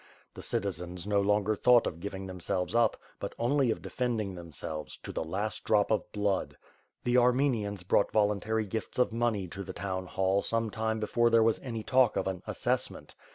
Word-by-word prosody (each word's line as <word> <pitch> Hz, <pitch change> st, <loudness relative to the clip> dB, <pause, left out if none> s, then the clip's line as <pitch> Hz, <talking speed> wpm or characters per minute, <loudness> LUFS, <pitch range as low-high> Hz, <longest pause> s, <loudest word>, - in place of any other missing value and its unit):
The -, -, -9 dB
citizens 90 Hz, -2 st, -3 dB
no 100 Hz, -1 st, +2 dB
longer 105 Hz, +1 st, +2 dB
thought 125 Hz, +2 st, +5 dB
of 80 Hz, -, -3 dB
giv 100 Hz, +2 st, -5 dB
ing 95 Hz, 0 st, -6 dB
themselves 90 Hz, +1 st, -3 dB
up, 120 Hz, 0 st, +3 dB, 0.2 s
but -, -, -5 dB
only 130 Hz, +2 st, +2 dB
of 110 Hz, -, -2 dB
defending 115 Hz, -6 st, -2 dB
themselves, 80 Hz, -3 st, -6 dB
to -, -, -8 dB
the -, -, -2 dB
last 100 Hz, +7 st, -3 dB
drop 105 Hz, -1 st, +2 dB
of 105 Hz, -4 st, 0 dB
blood. 100 Hz, -2 st, -1 dB, 0.5 s
The 120 Hz, +1 st, +2 dB
Armenians 120 Hz, -6 st, +1 dB
brought 95 Hz, +2 st, +2 dB
voluntary 110 Hz, +1 st, +1 dB
gifts 110 Hz, +2 st, -5 dB
of 125 Hz, -2 st, +2 dB
money 115 Hz, -5 st, 0 dB
to 100 Hz, +3 st, -7 dB
the 100 Hz, -, -6 dB
town 95 Hz, -1 st, -4 dB
hall 95 Hz, +2 st, +1 dB
some 115 Hz, -1 st, 0 dB
time 110 Hz, 0 st, -1 dB
before 120 Hz, +2 st, +2 dB
there, 115 Hz, -1 st, +5 dB
was 115 Hz, 0 st, +2 dB
any 115 Hz, -4 st, -5 dB
talk 130 Hz, -1 st, +3 dB
of 95 Hz, -, 0 dB
an 95 Hz, -2 st, -3 dB
assessment. -, -, -2 dB
105 Hz, 190 wpm, -30 LUFS, 95-115 Hz, 0.5 s, thought